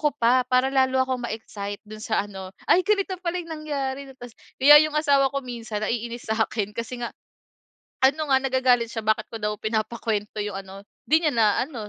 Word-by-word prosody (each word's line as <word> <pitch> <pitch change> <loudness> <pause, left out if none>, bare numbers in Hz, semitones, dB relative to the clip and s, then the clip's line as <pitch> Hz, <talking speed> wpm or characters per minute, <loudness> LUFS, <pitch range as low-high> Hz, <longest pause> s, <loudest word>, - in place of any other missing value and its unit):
ko 295 -1 +2
pa 250 0 +3
para 255 +1 +3
lalo 260 -1 +3
akong 255 -2 -3
ma-excite 205 -2 -6
dun 215 0 -9
sa 220 - +1
ano, 190 -2 -9 0.2
“Ay 365 - +5
ganito 400 -2 +1
pala 355 0 -2
yung 330 - -14
nangyari 280 -3 -4
'no.” 270 - -11
Ta’s 245 -1 -10 0.3
kaya 295 +2 +9
yung 310 - -3
asawa 280 -3 +3
ko 275 - -1
minsan 230 -4 -5
naiinis 235 0 -4
sa'kin 220 -1 -1
kasi 235 +1 -5
nga 235 - -2 1.0
ano 295 +3 +2
nga 265 - +6
nagagalit 255 -3 +2
siya, 225 - -3
bakit 220 0 +2
ko - - -4
daw 210 0 -1
pinapakwento 215 -1 -2
yung 205 -2 -4
ano, 195 +1 -11 0.3
‘di 310 - +6
niya 305 -3 +2
na 225 -2 +4 0.2
ano, 240 -7 -8
245 Hz, 195 wpm, -24 LUFS, 220-275 Hz, 1.0 s, kaya